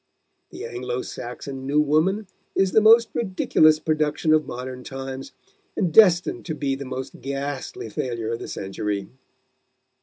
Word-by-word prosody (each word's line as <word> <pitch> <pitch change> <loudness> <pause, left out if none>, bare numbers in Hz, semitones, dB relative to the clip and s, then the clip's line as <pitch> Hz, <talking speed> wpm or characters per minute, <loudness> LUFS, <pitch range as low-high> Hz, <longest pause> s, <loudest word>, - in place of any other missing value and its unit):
The - - -8
Anglo 125 +1 -4
Saxon 130 +2 -7
'new 145 +2 +2
woman' 160 +8 +2 0.3
is 190 -1 +2
the 220 - +5
most 225 +2 +7
ridiculous 185 -7 +3
production 155 0 +1
of 155 -1 +2
modern 125 +1 -6
times, 135 0 -7 0.5
and 175 -5 0
destined 180 -4 +5
to 160 - -3
be 140 -2 -1
the 135 +1 -5
most 130 0 -6
ghastly 140 -3 -4
failure 115 0 -3
of 115 - -3
the - - -7
century." 100 0 -4
140 Hz, 145 wpm, -24 LUFS, 125-155 Hz, 0.5 s, most